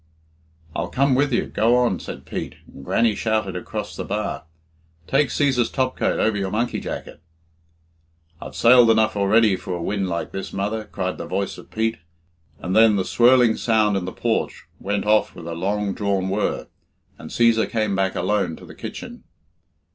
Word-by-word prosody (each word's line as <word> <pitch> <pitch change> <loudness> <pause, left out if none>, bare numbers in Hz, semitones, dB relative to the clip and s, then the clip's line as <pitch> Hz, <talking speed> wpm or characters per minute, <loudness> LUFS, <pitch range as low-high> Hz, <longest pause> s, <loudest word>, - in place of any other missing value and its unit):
"I'll 85 - -2
come 140 +1 +2
with 140 +2 +2
you 120 - +1
go 115 +3 +2
on," 120 -7 +1
said - - -8
Pete, - - -5
and 70 - -13
Grannie 115 +9 +2
shouted 110 -4 -1
across 90 - -5
the - - -4
bar 105 -3 -3 0.6
"Take 135 - +2
Cæsar's 130 -5 +1
topcoat 130 -1 0
over 110 -1 +2
your 100 -2 -2
monkey 115 +4 -1
jacket." - - -7 1.2
"I've - - -8
sail 120 0 +6
enough 110 -1 +3
already 105 +1 +4
for 90 0 -5
a 85 - -5
wind 100 -1 -1
like 85 -1 -3
this, 95 - -5
mother," 105 +3 -2
cried 95 -3 -4
the - - -5
voice 100 +1 -3
of - - -14
Pete, 115 +1 -1 0.6
and 90 - -3
then 110 -1 +6
the 95 -2 0
swirling 120 0 +4
sound 110 -3 +2
in 95 -2 -1
the 95 - -4
porch 115 +3 -2
went 100 +1 -2
off 105 0 +2
with 85 - -10
a 85 - -4
long 100 +3 -1
drawn 100 -2 -1
whirr, 100 +2 -1 0.5
and - - -9
Cæsar 115 -1 +3
came 110 -4 0
back 95 -1 0
alone 95 -2 0
to - - -13
the - - -12
kitchen. - - -8
105 Hz, 180 wpm, -22 LUFS, 95-115 Hz, 1.2 s, sail